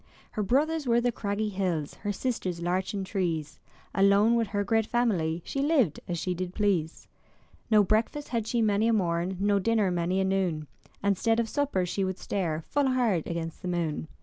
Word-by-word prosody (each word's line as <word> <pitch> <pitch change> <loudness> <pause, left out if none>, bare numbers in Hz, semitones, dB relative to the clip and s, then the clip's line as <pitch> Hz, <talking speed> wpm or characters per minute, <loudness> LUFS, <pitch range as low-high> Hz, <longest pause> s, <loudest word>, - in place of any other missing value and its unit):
Her 215 - -2
brothers 290 +8 +1
were 235 0 +4
the 245 0 +1
craggy 210 -1 -2
hills, 180 -7 -2
Her 205 - -4
sisters 195 -5 -2
larchen 185 +3 -1
trees; 170 -6 -2 0.3
Alone 200 +3 +4
with 230 -2 +2
her 205 0 -1
great 225 +1 +1
family 175 -9 0
She 275 - -2
lived 275 - +2
as 175 - -2
she 180 +2 -1
did 180 +1 -5
please. 185 -7 0 0.6
No 215 -2 +6
breakfast 225 +8 0
had 230 -3 -1
she 235 0 +1
many 210 +1 +2
a 230 - +3
morn. 180 -2 0
No 200 0 +2
dinner 215 -1 +2
many 175 +2 0
a - - +2
noon, 185 -5 0 0.4
And 200 -2 +2
'stead 225 0 +2
of 230 - +1
supper 275 -8 0
she 195 +3 -2
would 190 0 -2
stare 165 -5 -2
Full 285 -1 +1
hard 240 -10 +1
against 165 -1 -4
the 185 - -5
moon. 170 -3 -2
200 Hz, 190 wpm, -28 LUFS, 175-225 Hz, 0.6 s, No